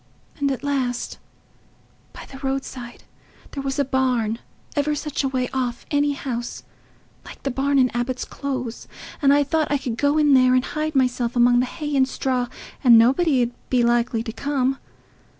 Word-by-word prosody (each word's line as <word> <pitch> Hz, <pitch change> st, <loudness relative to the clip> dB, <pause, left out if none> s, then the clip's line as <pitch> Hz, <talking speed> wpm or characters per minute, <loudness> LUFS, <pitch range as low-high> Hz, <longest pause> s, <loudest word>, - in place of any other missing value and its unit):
And 280 Hz, -1 st, +1 dB
at 265 Hz, -, -4 dB
last, 260 Hz, -4 st, -2 dB, 0.9 s
by -, -, -10 dB
the 270 Hz, -, -11 dB
roadside 265 Hz, -3 st, -5 dB, 0.5 s
there 275 Hz, -, -4 dB
was 270 Hz, -1 st, -3 dB
a 285 Hz, -, +2 dB
barn—ever 260 Hz, +3 st, -1 dB
such 295 Hz, -1 st, -3 dB
a -, -, +1 dB
way 255 Hz, -1 st, -1 dB
off 250 Hz, -2 st, -2 dB
any 290 Hz, 0 st, +2 dB
house—like 240 Hz, -4 st, -9 dB
the 275 Hz, -, -1 dB
barn 275 Hz, +2 st, +1 dB
in 255 Hz, -2 st, +4 dB
Abbot's 240 Hz, +2 st, -2 dB
Close, 255 Hz, -4 st, -5 dB, 0.3 s
and 280 Hz, -1 st, +5 dB
I 290 Hz, 0 st, +5 dB
thought 310 Hz, +2 st, 0 dB
I 290 Hz, -, +3 dB
could 255 Hz, -4 st, -4 dB
go 285 Hz, +1 st, +2 dB
in 295 Hz, -2 st, +4 dB
there 255 Hz, -1 st, +5 dB
and 255 Hz, -, +2 dB
hide 310 Hz, 0 st, -3 dB
myself 250 Hz, -2 st, +1 dB
among 245 Hz, 0 st, +5 dB
the 250 Hz, -, +1 dB
hay 295 Hz, +1 st, -4 dB
and 265 Hz, -1 st, +4 dB
straw, 255 Hz, -2 st, -1 dB, 0.4 s
and 240 Hz, -3 st, +8 dB
nobody 260 Hz, +3 st, +4 dB
'ud 240 Hz, -, -2 dB, 0.2 s
be 250 Hz, -2 st, +3 dB
likely 235 Hz, -1 st, +1 dB
to 225 Hz, -, -5 dB
come. 270 Hz, -1 st, -1 dB
265 Hz, 170 wpm, -23 LUFS, 245-280 Hz, 0.9 s, and